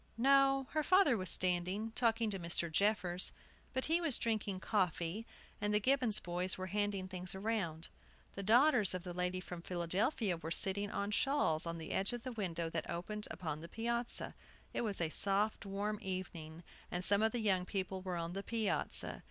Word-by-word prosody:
No, 270 +2 +4
her 310 - +1
father 370 -4 +5
was 185 -4 -3
standing, 185 +4 -1
talking 225 -1 +1
to 195 - -2
Mr. 170 -1 -1
Jeffers. 185 -1 +1 0.4
But 260 0 -1
he 330 +2 +2
was 315 -7 +2
drinking 215 -4 -1
coffee, 185 +1 0 0.3
and 210 0 +1
the - - +5
Gibbons 255 -2 +3
boys 180 +2 -2
were 185 - -4
handing 205 -2 0
things 185 0 -4
around. 190 -6 -2 0.5
The 200 - -5
daughters 225 - +5
of 180 - -4
the 180 -2 -6
lady 180 +1 -1
from 180 -1 -7
Philadelphia 180 - 0
were 160 0 -6
sitting 195 +4 +3
on 200 0 -2
shawls 205 - +1
on 170 0 -3
the 160 -1 -6
edge 195 +4 +1
of 240 -1 -5
the 255 - -4
window 175 -7 -2
that 165 -1 -4
opened 210 +5 -4
upon 155 -3 -4
the 170 - -9
piazza. 235 +3 0 0.4
It - - 0
was 210 -6 -1
a 160 -2 0
soft, 205 +5 +1
warm 205 +2 -2
evening, 175 -4 -5 0.3
and 180 +1 -3
some 200 +1 +4
of 220 0 +3
the 240 - -2
young 195 -4 +2
people 190 0 -3
were 185 -2 -3
on 170 0 -3
the 195 - -3
piazza. 220 0 0
195 Hz, 185 wpm, -36 LUFS, 175-225 Hz, 0.5 s, father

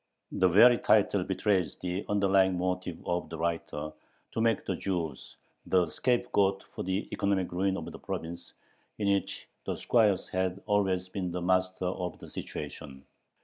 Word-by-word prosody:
The 95 - +3
very 115 +7 +7
title - - +3
betrays 95 -5 0
the 90 +2 -3
underlying 95 -2 +3
motive 90 -1 -2
of 85 -2 -1
the 80 - -6
writer, 80 -2 -2 0.4
to 115 - -2
make 115 -1 +2
the 95 - -1
Jews 85 -7 -3 0.3
the 90 -1 +4
scapegoat 100 -5 +1
for - - -8
the 95 +3 -2
economic 100 -2 0
ruin 95 +2 0
of - - -5
the - - -10
province, 85 +1 -6 0.4
in 100 -2 +2
which 100 - -3 0.2
the - - -2
squires 105 -5 +2
had 95 0 -1
always 95 -3 +1
been 90 -1 -3
the 90 +1 -3
masters 95 0 +1
of 90 -1 -4
the - - -12
situation. 70 -1 -7
95 Hz, 155 wpm, -30 LUFS, 90-100 Hz, 0.4 s, very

